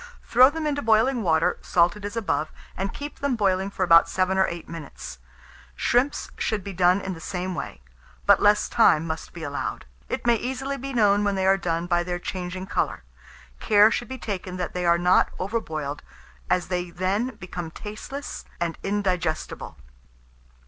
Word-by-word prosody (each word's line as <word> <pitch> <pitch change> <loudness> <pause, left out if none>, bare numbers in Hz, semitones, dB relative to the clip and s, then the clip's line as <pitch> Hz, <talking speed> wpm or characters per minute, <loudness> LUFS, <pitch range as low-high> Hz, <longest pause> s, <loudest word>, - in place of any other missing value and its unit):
Throw 250 +2 +6
them 320 +1 -4
into 285 -1 0
boiling 225 +3 +3
water, 165 -4 +2
salted 175 +4 +2
as 205 +3 -5
above, 175 -8 -1 0.2
and 195 +1 -2
keep 290 +1 -7
them 280 -3 0
boiling 195 -3 +1
for 195 - -2
about 165 -2 +6
7 185 0 +1
or 190 0 +3
8 170 -1 -6
minutes. 145 - -8 0.6
Shrimps 250 - +1
should 210 -3 -1
be 200 - -6
done 180 +2 +3
in 190 - -4
the 165 - -9
same 185 +1 -3
way; 65 - -6 0.4
but 200 -1 +6
less 210 0 +4
time 165 -9 +4
must 160 -1 -5
be 170 - -9
allowed. 145 -1 -4 0.2
It - - -3
may 240 - +5
easily 265 +3 -3
be 275 +2 -5
known 205 -4 +3
when 205 -1 +1
they 190 0 0
are 195 +1 +5
done 170 -3 -2
by 175 -1 +2
their 175 0 -3
changing 185 +1 -5
colour. 190 - -2 0.6
Care 210 +1 +5
should 240 - -2
be 260 - -6
taken 190 -5 -5
that 180 - -3
they 180 -1 -1
are 170 0 +5
not 180 +1 +4
over 205 +5 -1
boiled, 150 -6 -5 0.5
as 180 -1 +1
they 180 -1 -2
then 190 +8 -1
become 175 -2 -6
tasteless 215 - -7 0.2
and 170 -1 -2
indigestible. 185 -5 -2
190 Hz, 180 wpm, -25 LUFS, 175-220 Hz, 0.6 s, Throw